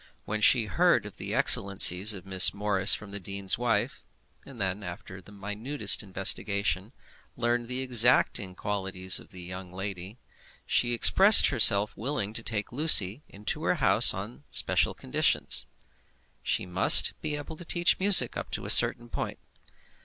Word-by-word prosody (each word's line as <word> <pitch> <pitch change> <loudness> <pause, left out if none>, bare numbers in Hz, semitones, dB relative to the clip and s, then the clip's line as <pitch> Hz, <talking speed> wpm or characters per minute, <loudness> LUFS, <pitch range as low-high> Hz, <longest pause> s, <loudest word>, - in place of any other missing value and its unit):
When 110 0 -6
she 115 +1 +2
heard 95 -5 0
of - - -12
the - - -7
excellencies 100 0 +4
of 100 -3 -8
Miss 95 -1 +3
Morris 100 -1 +2
from 105 -2 -11
the 100 - -7
dean's 100 0 -3
wife, 115 -4 -3 0.4
and 135 -4 -14
then, 95 0 -4
after 90 0 -11
minutest 105 +8 -2
investigation, 100 +1 -3 0.5
learned 120 0 -3
the 125 +1 -6
exact 125 -1 +3 0.2
qualities 95 -2 -2
of - - -18
the 90 -2 -12
young 90 0 -10
lady, 95 +2 -8 0.5
she 120 -1 -1
expressed 195 - +6
herself 105 -5 +1
willing 110 -3 -5
to 115 - -6
take 110 -2 -5
Lucy 125 - +2
into 105 +1 -8
her - - -1
house - - +2
on 65 +3 -10
special - - +1
conditions. 65 - -1 0.7
She - - -3
must 90 +2 +3
be 150 - -5
able 145 +2 -10
to 175 - -12
teach 175 +1 0
music 195 0 +3
up - - -8
to - - -6
a - - -1
certain 120 - +3
point. - - -7
105 Hz, 155 wpm, -25 LUFS, 95-120 Hz, 0.7 s, expressed